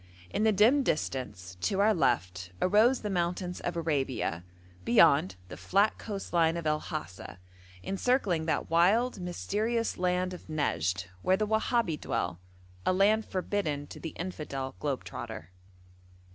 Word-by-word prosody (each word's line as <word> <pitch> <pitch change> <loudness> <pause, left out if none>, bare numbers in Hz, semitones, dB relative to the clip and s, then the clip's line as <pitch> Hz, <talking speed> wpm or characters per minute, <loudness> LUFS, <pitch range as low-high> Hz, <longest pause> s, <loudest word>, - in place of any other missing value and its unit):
In 215 - 0
the 220 - +5
dim 220 +8 +5
distance, 125 - -3
to 195 - 0
our 215 +2 +5
left, 90 - 0
arose 220 +7 +4
the 210 - -3
mountains 180 0 -1
of 175 -1 -3
Arabia; 135 - -1 0.4
beyond, 95 +1 +5
the 90 - -9
flat 200 +3 +2
coast 200 -4 -6
line 165 -1 +3
of 170 - -5
El 150 0 +2
Hasa, 100 - -7 0.5
encircling 195 -6 0
that 160 - 0
wild, 200 +9 +3
mysterious 215 +6 -2
land 180 0 0
of 180 - -10
Nejd, 95 - -1 0.2
where 185 - +3
the 215 - 0
Wahabi 220 - 0
dwell 85 0 -2 0.4
a - - +2
land 210 +4 +3
forbidden 180 -6 -2
to - - -11
the 165 - -7
infidel 150 -7 -4
globe 140 -3 -2
trotter. 110 -7 -7
175 Hz, 145 wpm, -29 LUFS, 135-205 Hz, 0.5 s, the